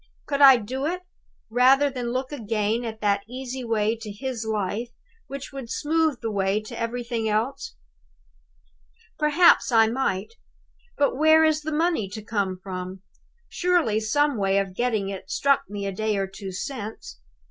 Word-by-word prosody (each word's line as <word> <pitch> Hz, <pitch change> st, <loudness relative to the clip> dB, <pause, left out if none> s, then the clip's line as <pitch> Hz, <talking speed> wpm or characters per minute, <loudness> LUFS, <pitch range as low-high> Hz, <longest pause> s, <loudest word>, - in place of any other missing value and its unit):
Could 280 Hz, -1 st, -1 dB
I 270 Hz, -2 st, +10 dB
do 260 Hz, +6 st, -3 dB
it, 360 Hz, +2 st, -3 dB, 0.5 s
rather 265 Hz, +4 st, +5 dB
than 245 Hz, -2 st, -4 dB
look 255 Hz, +2 st, -3 dB
again 225 Hz, -3 st, -1 dB
at 220 Hz, -2 st, -6 dB
that 200 Hz, -1 st, +2 dB
easy 255 Hz, 0 st, -6 dB
way 225 Hz, -1 st, +1 dB
to 220 Hz, -2 st, -8 dB
his 240 Hz, +2 st, -4 dB
life 215 Hz, +2 st, -2 dB, 0.4 s
which 275 Hz, 0 st, -7 dB
would 265 Hz, -4 st, -7 dB
smooth 310 Hz, 0 st, 0 dB
the 225 Hz, -, -2 dB
way 195 Hz, 0 st, +1 dB
to 215 Hz, -, -9 dB
everything 230 Hz, -1 st, -2 dB
else? 230 Hz, -, -2 dB, 1.4 s
"Perhaps 305 Hz, 0 st, +5 dB
I 225 Hz, -1 st, +6 dB
might. 220 Hz, -3 st, -1 dB, 0.6 s
But 280 Hz, -2 st, +1 dB
where 315 Hz, +1 st, +6 dB
is 310 Hz, -1 st, +2 dB
the 310 Hz, +1 st, -4 dB
money 315 Hz, -, 0 dB
to 215 Hz, +1 st, -7 dB
come 200 Hz, -4 st, -2 dB
from? 185 Hz, 0 st, -6 dB, 0.4 s
Surely 345 Hz, -12 st, +1 dB
some 285 Hz, +5 st, +1 dB
way 195 Hz, -1 st, +1 dB
of 195 Hz, -1 st, -1 dB
getting 220 Hz, -4 st, 0 dB
it 195 Hz, -1 st, -7 dB
struck 275 Hz, 0 st, +1 dB
me 200 Hz, -1 st, -5 dB
a 195 Hz, -, -2 dB
day 215 Hz, +2 st, -1 dB
or 195 Hz, -, 0 dB
two 195 Hz, 0 st, -8 dB
since? 205 Hz, -, -6 dB
230 Hz, 160 wpm, -25 LUFS, 205-275 Hz, 1.4 s, I